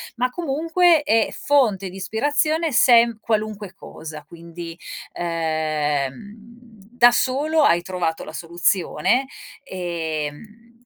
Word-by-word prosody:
ma 250 Hz, +1 st, 0 dB
comunque 330 Hz, +3 st, +2 dB
è 225 Hz, -7 st, +3 dB
fonte 220 Hz, -10 st, +1 dB
di 185 Hz, -, -10 dB
ispirazione 290 Hz, -, 0 dB
sem 235 Hz, -2 st, +5 dB
qualunque 215 Hz, -3 st, -3 dB
cosa. 155 Hz, -5 st, -10 dB
Quindi, 170 Hz, +1 st, -10 dB, 0.3 s
ehm, 165 Hz, -1 st, -3 dB, 0.6 s
da 225 Hz, -, -1 dB
solo 295 Hz, +6 st, +1 dB
hai 175 Hz, -10 st, +4 dB
trovato 175 Hz, -3 st, -3 dB
la 155 Hz, -, -10 dB
soluzione, 175 Hz, -, 0 dB, 0.4 s
ehm, 180 Hz, -, -6 dB
215 Hz, 100 wpm, -22 LUFS, 175-250 Hz, 0.6 s, sem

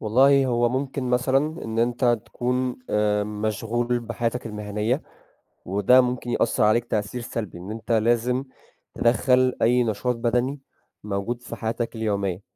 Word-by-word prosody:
والله 135 Hz, +5 st, +4 dB
هو 120 Hz, -1 st, +2 dB
ممكن 130 Hz, +1 st, -2 dB
مثلًا 135 Hz, +6 st, +1 dB
إن 115 Hz, 0 st, -4 dB
أنت 120 Hz, 0 st, +2 dB
تكون 125 Hz, 0 st, -2 dB
آآ 105 Hz, -1 st, +2 dB
مشغول 110 Hz, +3 st, -1 dB
بحياتك 120 Hz, +1 st, -3 dB
المهنية 105 Hz, +5 st, -2 dB, 0.6 s
وده 100 Hz, +7 st, +5 dB
ممكن 125 Hz, -1 st, -2 dB
يأثّر 120 Hz, -, +1 dB
عليك 110 Hz, +3 st, +3 dB
تأثير 110 Hz, +2 st, -2 dB
سلبي، 110 Hz, -6 st, -5 dB
إن 90 Hz, +4 st, -8 dB
أنت 115 Hz, +2 st, -6 dB
لازم 120 Hz, +3 st, +2 dB, 0.5 s
تدَخّل 125 Hz, +2 st, +3 dB
أي 125 Hz, +2 st, +4 dB
نشاط 120 Hz, +2 st, -1 dB
بَدَني 125 Hz, +4 st, 0 dB, 0.4 s
موجود 105 Hz, +4 st, -3 dB
في -, -, -7 dB
حياتك 115 Hz, +1 st, -3 dB
اليومية 100 Hz, -4 st, -1 dB
120 Hz, 135 wpm, -24 LUFS, 105-125 Hz, 0.6 s, وده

